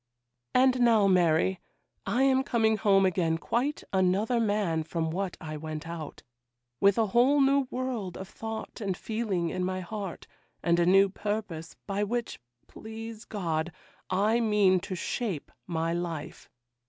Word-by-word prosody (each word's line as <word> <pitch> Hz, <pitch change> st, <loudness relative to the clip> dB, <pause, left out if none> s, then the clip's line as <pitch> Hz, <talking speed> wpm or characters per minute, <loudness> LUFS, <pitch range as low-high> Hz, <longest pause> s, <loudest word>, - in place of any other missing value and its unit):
'And 255 Hz, 0 st, +4 dB
now, 225 Hz, -4 st, +5 dB
Mary, 180 Hz, -1 st, +3 dB, 0.5 s
I 240 Hz, +7 st, +2 dB
am 265 Hz, -1 st, +4 dB
coming 225 Hz, -4 st, +2 dB
home 195 Hz, -1 st, +4 dB
again 170 Hz, -3 st, +1 dB
quite 255 Hz, -, -1 dB
another 195 Hz, +6 st, +2 dB
man 205 Hz, -7 st, +1 dB
from 160 Hz, 0 st, -2 dB
what 185 Hz, +1 st, -3 dB
I 155 Hz, -2 st, -6 dB
went 155 Hz, +1 st, -6 dB
out; 165 Hz, -3 st, -7 dB, 0.6 s
with 200 Hz, +1 st, +4 dB
a 225 Hz, -, +3 dB
whole 260 Hz, +5 st, +5 dB
new 275 Hz, -1 st, +3 dB
world 245 Hz, -8 st, -3 dB
of 190 Hz, -, -7 dB
thought 225 Hz, +3 st, -7 dB
and 195 Hz, -3 st, -2 dB
feeling 210 Hz, -7 st, -2 dB
in 185 Hz, -, -2 dB
my 185 Hz, 0 st, -2 dB
heart, 195 Hz, -1 st, -6 dB, 0.4 s
and 170 Hz, 0 st, +3 dB
a 170 Hz, -, +3 dB
new 195 Hz, +2 st, +6 dB
purpose, 200 Hz, -5 st, -4 dB
by 200 Hz, 0 st, -1 dB
which, 235 Hz, +3 st, -3 dB, 0.3 s
please 225 Hz, 0 st, -9 dB
God, 170 Hz, -5 st, -2 dB, 0.4 s
I 210 Hz, +5 st, +2 dB
mean 210 Hz, -5 st, +3 dB
to 185 Hz, -, -5 dB
shape 185 Hz, -, -3 dB, 0.2 s
my 165 Hz, -1 st, -1 dB
life. 165 Hz, -3 st, -5 dB
195 Hz, 150 wpm, -28 LUFS, 175-225 Hz, 0.6 s, new